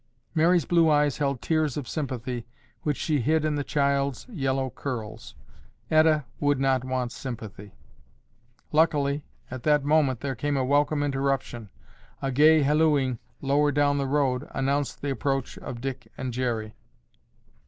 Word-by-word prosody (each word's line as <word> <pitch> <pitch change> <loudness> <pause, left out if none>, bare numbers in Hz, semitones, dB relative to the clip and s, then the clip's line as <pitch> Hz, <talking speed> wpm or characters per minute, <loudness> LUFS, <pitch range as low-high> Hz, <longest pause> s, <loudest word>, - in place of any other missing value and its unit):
Mary's 170 0 +3
blue 170 -2 +4
eyes 145 -2 +2
held 140 -4 -1
tears 155 -4 0
of 140 -4 -4
sympathy 125 -5 -4 0.3
which 150 -2 -1
she 150 -4 0
hid 155 +5 +2
in 155 - +1
the 145 -1 -1
child's 140 -2 0
yellow 135 - -1
curls. 110 - -6 0.6
Etta 155 -2 +4
would 145 -2 +2
not 135 -1 +2
want 130 -2 -2
sympathy. 110 - -8 1.0
Luckily 150 -2 +2 0.3
at 130 -1 -6
that 150 +1 +3
moment 145 -5 +2
there 140 -1 -2
came 145 +3 -1
a 130 - +1
welcome 145 +2 +2
interruption. 135 -5 -2 0.5
A 135 - -2
gay 155 +3 +5
hallooing 145 -4 +2 0.2
lower 145 +2 +2
down 145 0 +2
the 135 - -1
road 135 -1 0
announced 140 +1 -1
the 140 - -1
approach 135 0 -2
of 120 -1 -7
Dick 130 -1 -5
and 130 -2 -4
Jerry. 115 -4 -2
140 Hz, 145 wpm, -26 LUFS, 130-150 Hz, 1.0 s, gay